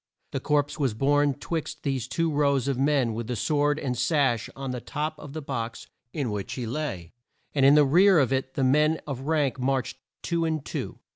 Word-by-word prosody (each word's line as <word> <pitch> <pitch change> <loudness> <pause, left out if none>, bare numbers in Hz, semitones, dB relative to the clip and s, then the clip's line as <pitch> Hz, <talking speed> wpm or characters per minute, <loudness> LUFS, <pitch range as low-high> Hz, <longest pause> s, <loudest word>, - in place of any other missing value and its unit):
The - - -2
corpse 145 +1 0
was 130 -7 0
borne 145 +2 +2
twixt 155 0 -5
these 135 -4 -1
two 165 +4 0
rows 140 -3 +2
of 140 - +1
men 135 -4 +2
with 115 0 -4
the 125 - -2
sword 145 +5 +1
and 130 -4 -2
sash 130 -3 +1
on 135 -1 -4
the 125 -1 -4
top 155 +5 -3
of 145 - -10
the 155 -1 -5
box 120 -4 -4 0.3
in 135 -7 -2
which 105 -2 -4
he 125 - -4
lay, 115 - -4 0.4
and 140 - +1
in 140 - +7
the 150 -1 +6
rear 185 +7 +5
of 135 -3 +3
it 130 0 -2
the 135 - 0
men 150 +4 +3
of 135 -1 -5
rank 150 -5 +1
marched 135 0 -1 0.2
two 170 -1 0
and 160 -3 -1
two. - - -5
140 Hz, 210 wpm, -26 LUFS, 130-150 Hz, 0.4 s, in